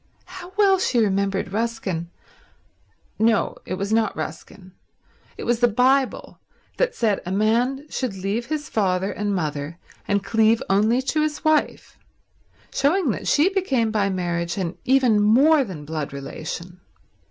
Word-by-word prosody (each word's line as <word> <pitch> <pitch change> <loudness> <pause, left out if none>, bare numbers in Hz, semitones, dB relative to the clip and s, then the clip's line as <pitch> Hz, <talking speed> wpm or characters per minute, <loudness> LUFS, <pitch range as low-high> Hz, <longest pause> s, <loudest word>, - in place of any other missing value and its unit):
How 365 0 -10
well 390 -2 +4
she 260 -9 0
remembered 195 -3 0
Ruskin—no, 220 +1 -4
it - - -2
was 200 +3 -2
not 225 0 +1
Ruskin, 170 +4 -7 0.7
it - - -6
was 240 -1 0
the 240 - +5
Bible 255 +4 +1 0.4
that - - 0
said 215 -4 +1
a 180 - -5
man 235 +7 +1
should 255 -9 -3
leave 200 +5 -3
his 305 -1 -3
father 190 -2 0
and 205 -1 -2
mother 150 -1 -3 0.3
and 200 -1 +1
cleave 225 0 +2
only 220 +6 +3
to 305 +4 0
his 305 +1 -2
wife; 310 -1 0 0.7
showing 295 +1 +2
that - - -5
she 300 +6 +4
became 265 - +1
by 205 -2 +1
marriage 175 -2 -2
an 185 -2 -3
even 250 -5 +4
more 275 +8 +5
than 175 - -8
blood 155 -1 -4
relation. 160 +6 -7
220 Hz, 140 wpm, -23 LUFS, 185-265 Hz, 0.7 s, the